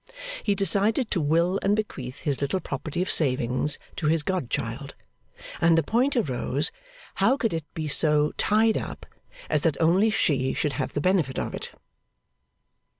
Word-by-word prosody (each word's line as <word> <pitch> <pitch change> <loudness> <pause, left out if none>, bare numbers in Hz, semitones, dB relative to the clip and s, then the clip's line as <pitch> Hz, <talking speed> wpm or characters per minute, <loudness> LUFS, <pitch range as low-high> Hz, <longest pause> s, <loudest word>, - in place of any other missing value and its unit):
He 205 - 0
decided 210 +4 +1
to 175 - +1
will 170 +6 +2
and 200 +1 +2
bequeath 135 -12 -5
his 145 -3 -1
little 140 +7 0
property 155 +2 -3
of 190 - -2
savings 130 0 +2 0.2
to 155 - -1
his 160 0 +2
godchild, 185 -10 -3 0.7
and 165 0 +5
the 165 - +3
point 250 - +1
arose 140 - 0 0.5
how 270 - +4
could 225 -8 -1
it 160 -2 -5
be 155 -1 -3
so 150 0 +4
'tied 220 +1 +2
up' - - -7 0.4
as - - +1
that 160 -4 0
only 180 +7 +4
she 135 -11 +1
should 150 - -1
have 130 -1 -3
the 145 - -1
benefit 175 -7 +1
of - - -3
it? - - -5
165 Hz, 160 wpm, -25 LUFS, 145-195 Hz, 0.7 s, and